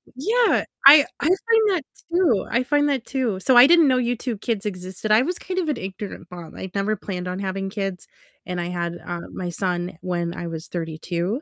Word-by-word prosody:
Yeah, 450 Hz, -, +2 dB, 0.2 s
I 285 Hz, +1 st, +10 dB
I 295 Hz, -, 0 dB
find 440 Hz, +3 st, +3 dB
that 360 Hz, -7 st, 0 dB, 0.3 s
too, 335 Hz, -, +2 dB
I 240 Hz, +2 st, +2 dB
find 290 Hz, +2 st, +2 dB
that 265 Hz, -4 st, -1 dB
too, 245 Hz, -8 st, -2 dB
so 250 Hz, +5 st, +3 dB
I 245 Hz, -, +10 dB
didn't 335 Hz, -1 st, +6 dB
know 255 Hz, -1 st, +3 dB
YouTube 245 Hz, -2 st, -2 dB
Kids 220 Hz, -4 st, -2 dB
existed, 185 Hz, +2 st, -5 dB
I 220 Hz, +4 st, +6 dB
was 355 Hz, +4 st, -3 dB
kind 370 Hz, 0 st, -3 dB
of 335 Hz, -, -2 dB
an 280 Hz, -, -1 dB
ignorant 190 Hz, -2 st, -7 dB
mom, 175 Hz, -2 st, -10 dB
I'd 190 Hz, 0 st, -8 dB
never 200 Hz, +2 st, 0 dB
planned 180 Hz, -2 st, -6 dB
on 180 Hz, +1 st, -4 dB
having 195 Hz, 0 st, -3 dB
kids, 195 Hz, -3 st, -4 dB, 0.4 s
and 180 Hz, -1 st, -3 dB
I 175 Hz, -, -3 dB
had, 175 Hz, -1 st, -3 dB
uh, 175 Hz, -1 st, -4 dB
my 180 Hz, -1 st, -4 dB
son 175 Hz, -1 st, -3 dB
when 175 Hz, -1 st, -2 dB
I 175 Hz, -, -5 dB
was 160 Hz, -1 st, -6 dB
32, 175 Hz, -, -3 dB
200 Hz, 210 wpm, -23 LUFS, 180-275 Hz, 0.4 s, I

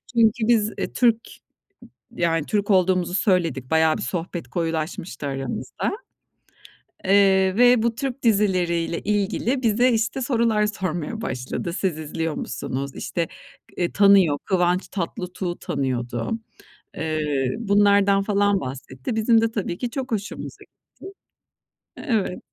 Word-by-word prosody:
Çünkü 225 Hz, 0 st, +3 dB
biz, 220 Hz, -3 st, +3 dB
e, -, -, -3 dB
Türk 235 Hz, -2 st, +4 dB, 1.0 s
yani 165 Hz, -3 st, 0 dB
Türk 205 Hz, 0 st, 0 dB
olduğumuzu 185 Hz, -1 st, +2 dB
söyledik. 170 Hz, -, +1 dB
Bayağı 160 Hz, +1 st, +3 dB
bir -, -, -6 dB
sohbet 175 Hz, -1 st, -4 dB
koyulaşmıştı 165 Hz, -, -3 dB
aramızda. 135 Hz, -1 st, -3 dB, 1.1 s
Eee, 190 Hz, -1 st, +4 dB
ve 245 Hz, -1 st, +5 dB
bu 235 Hz, -1 st, +1 dB
Türk 270 Hz, +1 st, -4 dB
dizileri 195 Hz, -6 st, +2 dB
ile 170 Hz, 0 st, -2 dB
ilgili 210 Hz, +6 st, 0 dB
bize, 240 Hz, +3 st, +3 dB
işte, 225 Hz, +4 st, 0 dB
sorular 230 Hz, -4 st, +2 dB
sormaya 185 Hz, +1 st, -3 dB
başladı. 130 Hz, -, -4 dB
"Siz 180 Hz, -4 st, -1 dB
izliyor 160 Hz, +1 st, -3 dB
musunuz?" 135 Hz, +1 st, -4 dB
İşte 170 Hz, -1 st, -3 dB, 0.5 s
eee 175 Hz, -1 st, -1 dB
tanıyor 195 Hz, -7 st, +5 dB
Kıvanç 180 Hz, -1 st, +1 dB
Tatlıtuğ'u 180 Hz, -1 st, -4 dB
tanıyordu. 120 Hz, -4 st, -2 dB, 0.7 s
Eee, 150 Hz, -4 st, -1 dB
bunlardan 200 Hz, -2 st, +4 dB
falan 205 Hz, -1 st, +2 dB
bahsetti. 130 Hz, -, -6 dB
Bizim 225 Hz, +1 st, +4 dB
de 225 Hz, -, +1 dB
tabii 185 Hz, -5 st, -3 dB
ki 245 Hz, -2 st, -3 dB
çok 265 Hz, -1 st, -5 dB
hoşumuza 205 Hz, -1 st, -5 dB
gitti. -, -, -29 dB, 1.3 s
E, -, -, -8 dB
evet 205 Hz, -6 st, -1 dB
190 Hz, 125 wpm, -23 LUFS, 165-220 Hz, 1.3 s, ve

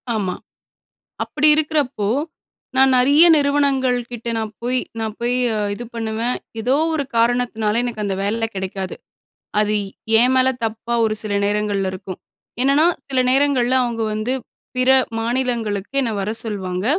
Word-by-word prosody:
ஆமா. 190 Hz, -4 st, -1 dB, 0.9 s
அப்டி 305 Hz, 0 st, +2 dB
இருக்குறப்போ 295 Hz, -9 st, 0 dB, 0.7 s
நான் 265 Hz, 0 st, +5 dB
நெறைய 285 Hz, +7 st, +6 dB
நிறுவனங்கள் 280 Hz, -3 st, +2 dB
கிட்ட 235 Hz, -1 st, -6 dB
நான் 220 Hz, -1 st, -3 dB
போய் 250 Hz, +1 st, 0 dB, 0.2 s
நான் 220 Hz, -1 st, -3 dB
போய் 240 Hz, +1 st, 0 dB, 0.4 s
இது 240 Hz, -, -7 dB
பண்ணுவேன். 225 Hz, +2 st, -2 dB, 0.2 s
ஏதோ 250 Hz, +4 st, +1 dB, 0.2 s
ஒரு 285 Hz, -3 st, -1 dB
காரணத்தினால 230 Hz, -2 st, +1 dB
எனக்கு 225 Hz, -3 st, -4 dB
அந்த 195 Hz, -1 st, -1 dB
வேல 225 Hz, +3 st, 0 dB
கிடைக்காது. 190 Hz, 0 st, -4 dB, 0.7 s
அது 210 Hz, 0 st, +1 dB, 0.5 s
என் 250 Hz, +2 st, +4 dB
மேல 260 Hz, 0 st, +4 dB, 0.2 s
தப்பா 225 Hz, +2 st, -3 dB
ஒரு 215 Hz, -1 st, +1 dB
சில 210 Hz, -1 st, -4 dB
நேரங்கள்ல 205 Hz, -2 st, 0 dB
இருக்கும். 185 Hz, 0 st, -7 dB, 0.4 s
என்னன்னா, 280 Hz, +4 st, +4 dB, 0.2 s
சில 265 Hz, -1 st, -1 dB
நேரங்கள்ல 260 Hz, -2 st, +2 dB
அவங்க 230 Hz, -2 st, -2 dB
வந்து 215 Hz, +4 st, -2 dB, 0.4 s
பிற 255 Hz, +1 st, +3 dB, 0.3 s
மாநிலங்களுக்கு 235 Hz, -2 st, -2 dB
என்ன 240 Hz, -4 st, -1 dB
வர 200 Hz, +2 st, -2 dB
சொல்வாங்க, 190 Hz, -3 st, -3 dB
235 Hz, 135 wpm, -20 LUFS, 210-260 Hz, 0.9 s, நெறைய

